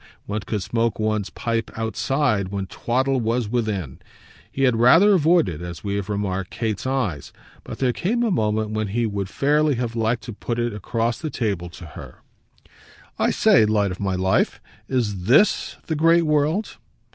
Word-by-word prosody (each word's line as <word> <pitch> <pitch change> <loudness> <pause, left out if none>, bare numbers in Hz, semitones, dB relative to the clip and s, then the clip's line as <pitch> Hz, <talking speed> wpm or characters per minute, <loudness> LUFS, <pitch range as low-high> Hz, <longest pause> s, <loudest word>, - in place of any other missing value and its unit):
One 105 +1 -3
could 105 -1 -3
smoke 115 0 0
one's 110 -2 -1
pipe 115 -2 -2
outside 110 -1 0
when 100 0 -4
twaddle 130 +7 0
was 115 0 0
within. 105 - -2 0.5
He 135 - -2
had 125 -3 +3
rather 165 - +6
avoided, 160 - +2
as 85 -1 -7
we 100 -1 -2
have 100 0 -3
remarked, 95 -2 -2
Kate's 110 +1 -3
eyes, 125 - -2 0.3
but - - -8
there 125 -2 +1
came 235 - 0
a 230 - +1
moment 110 - 0
when 110 0 -1
he 115 +4 -1
would 100 -3 -3
fairly 150 +3 +2
have 120 -1 -3
liked 115 +1 0
to 120 - -7
put 115 +3 -4
it 120 -1 -1
across 115 +3 -2
the 155 - -4
table, 100 - -2
to 85 0 -11
her: 75 - -12 1.0
"I - - +3
say, 110 - +4
light 105 -2 +1
of 90 - -7
my 95 -2 -1
life, 95 +1 +1 0.3
is 105 -8 -1
THIS 145 - +3
the 160 - -2
great 165 +2 +4
world?" 155 +6 0
115 Hz, 175 wpm, -22 LUFS, 100-130 Hz, 1.0 s, rather